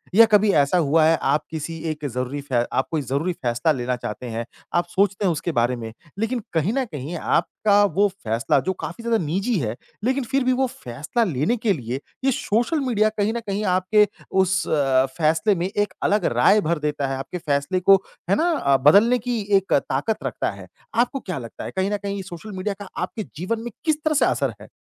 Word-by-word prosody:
या 230 - +9
कभी 210 0 +5
ऐसा 145 +5 +3
हुआ 155 0 +3
है 165 0 +4
आप 150 0 +1
किसी 160 +1 -4 0.2
एक 150 -1 -5
ज़रूरी 125 +4 -3
फै 130 -4 0
आप 130 - +1
कोई 160 -2 0
ज़रूरी 140 +7 -1
फैसला 125 +4 0
लेना 125 -2 -1
चाहते 125 +1 -6
हैं, 115 +1 -3 0.3
आप 175 0 +2
सोचते 200 +2 +1
हैं 180 - +3
उसके 165 +2 -2
बारे 120 -2 +1
में 115 -2 -7 0.3
लेकिन 235 +3 0
कहीं 165 +6 +1
न 265 0 0
कहीं 155 - -6
आपका 205 +5 +2
वो 205 +1 +2
फैसला, 125 - 0
जो 190 - -1
काफ़ी 230 +5 -7
ज़्यादा 230 -1 +2
निजी 195 +9 0
है, 110 -3 -2 0.3
लेकिन 260 +3 +1
फिर 265 +2 0
भी 255 0 +2
वो 260 +1 +1
फैसला 150 - -3
लेने 180 - 0
के 220 -2 +1
लिए 125 -4 -4 0.3
ये 270 - +4
सोशल 240 +7 0
मीडिया 215 -2 +3
कहीं 210 +2 +1
न 235 - -2
कहीं 200 +1 -1
आपके 205 +3 +3 0.2
उस 185 -2 +2
अ, 135 -3 +3
फैसले 165 +6 +2
में 175 +2 -1
एक 205 +1 -1
अलग 205 -1 +2
राय 205 +12 +5
भर 170 -1 0
देता 145 -2 -1
है, 135 0 -2
आपके 135 +7 -5
फैसले 150 +2 0
को 195 +2 +6 0.3
है 195 - +4
ना 300 - +2
बदलने 210 +11 +6
की 240 -2 0 0.2
एक 195 0 -1
ताकत 140 +10 0
रखता - - -2
है। - - -11 0.3
आपको 245 +4 +1
क्या 180 - -5
लगता 115 -3 -8
है - - -5
कहीं 190 +2 +1
न 205 - 0
कहीं 200 0 -4
ये 195 - -5
सोशल 185 +3 -9
मीडिया 200 +2 -2
का 195 - -8
आपके 220 - -3
जीवन 185 +9 -2
में 240 - -5
किस 310 -2 +2
तरह 310 - +2
से - - +5
असर - - 0
है? - - -11
185 Hz, 220 wpm, -23 LUFS, 145-215 Hz, 0.3 s, या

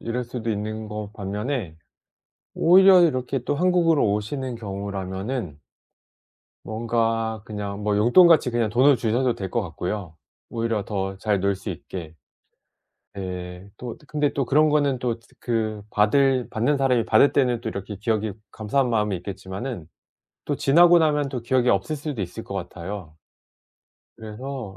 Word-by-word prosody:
이럴 125 +2 -3
수도 115 -1 -4
있는 110 +1 -4
거 105 -1 -6
반면에 105 - -4 0.8
오히려 185 +2 +7
이렇게 135 -5 +1
또 145 - -1
한국으로 165 - +3
오시는 125 +5 -3
경우라면은 100 - -5 1.0
뭔가 115 -1 -1
그냥 105 -1 -5
뭐 105 0 +1
용돈같이 145 - +6
그냥 120 -2 0
돈을 130 +5 +5
주셔도 120 +2 +1
될 95 -2 -5
것 120 - 0
같고요 90 -1 -5 0.3
오히려 115 -3 -2
더 95 -1 -3
잘 105 0 0
놀 100 +1 +1
수 95 +2 -8
있게. 85 -2 -8 1.0
네. 90 -1 -7
또 120 -2 -6
근데 150 -1 0
또 140 - 0
그런 150 +5 +4
거는 145 -3 +1
또 120 -2 -2
즈 115 - -25
그 110 -3 -2
받을 130 +5 +2
받는 120 +7 +1
사람이 125 -4 +2
받을 110 +6 +5
때는 125 -4 +1
또 - - -3
이렇게 100 +1 -6
기억이 110 0 -1 0.2
감사한 125 +5 0
마음이 105 -3 +1
있겠지만은 95 - -6 0.6
또 - - -1
지나고 170 +5 +6
나면 150 -3 +1
또 130 -2 -4
기억이 125 +1 +1
없을 100 +11 +1
수도 145 -6 -5
있을 95 +5 -6
것 - - -8
같아요. 90 -2 -6 1.0
그래서 110 -1 -7
115 Hz, 300 characters per minute, -24 LUFS, 100-130 Hz, 1.0 s, 오히려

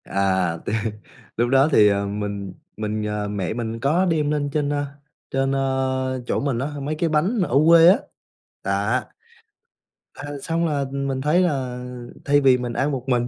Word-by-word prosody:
À, 95 -3 0
tê - - -2 0.6
lúc 120 +1 +1
đó 135 +2 +5
thì, 105 -6 +6
ờ, 100 0 +1
mình 100 -2 -4 0.2
mình 110 0 -2
ờ, 105 -1 -2
mẹ 100 -3 -3
mình 115 -1 -4
có 155 +9 +2
đem 155 -4 +1
lên 145 -1 -1
trên, 150 -2 0
à, 145 0 -1 0.5
trên, 135 0 0
à, - - 0 0.7
chỗ - - -1
mình 140 -4 -1
á, 135 - -1
mấy 150 +3 -2
cái 165 +2 0
bánh 170 +10 +1
ở 130 - +2
quê 165 0 +8
á. 190 +5 +7 0.7
Đó. - - 0 1.1
À, 145 - -8
xong 165 +2 -1
là 145 -3 -1
mình 140 -1 -2
thấy 150 +6 +3
là 130 -7 -1 0.4
thay 145 0 +4
vì 130 -2 +5
mình 125 -1 -4
ăn 145 +5 0
một 130 -3 -3
mình 120 -2 +1
135 Hz, 180 wpm, -22 LUFS, 110-150 Hz, 1.1 s, quê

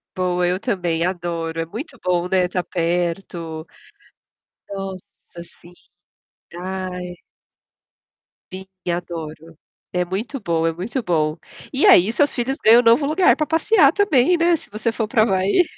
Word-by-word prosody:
Boa, 180 -1 0
eu 180 +2 0
também 175 -7 -1
adoro, 170 -2 -3
é - - -3
muito 250 - -8
bom, 180 -1 0
né, 185 0 +2
estar 180 0 -2
perto. 170 -1 -3 1.0
Nossa, 190 -3 -9
sim. 175 0 -18 0.9
Ai. 180 -1 -5 1.4
Sim, 190 0 -7 0.3
adoro. 165 -2 -7 0.4
É 180 - +1
muito 210 +10 -4
bom, 165 -5 -1
é 165 - 0
muito 205 +10 -4
bom. 155 -5 0 0.3
E 270 - +1
aí 190 +5 +6
seus 285 +4 +1
filhos 265 +3 -2
ganham 230 +2 +8
um - - -10
novo 235 +5 +4
lugar 320 +5 +3
para 305 - 0
passear 325 -1 +4
também, 355 - +3
né, 340 +1 +3
se - - -17
você 220 +3 -2
for 225 -1 -3
para 225 -1 +2
o - - +6
havaí. 195 - +2
185 Hz, 150 wpm, -21 LUFS, 175-235 Hz, 1.4 s, ganham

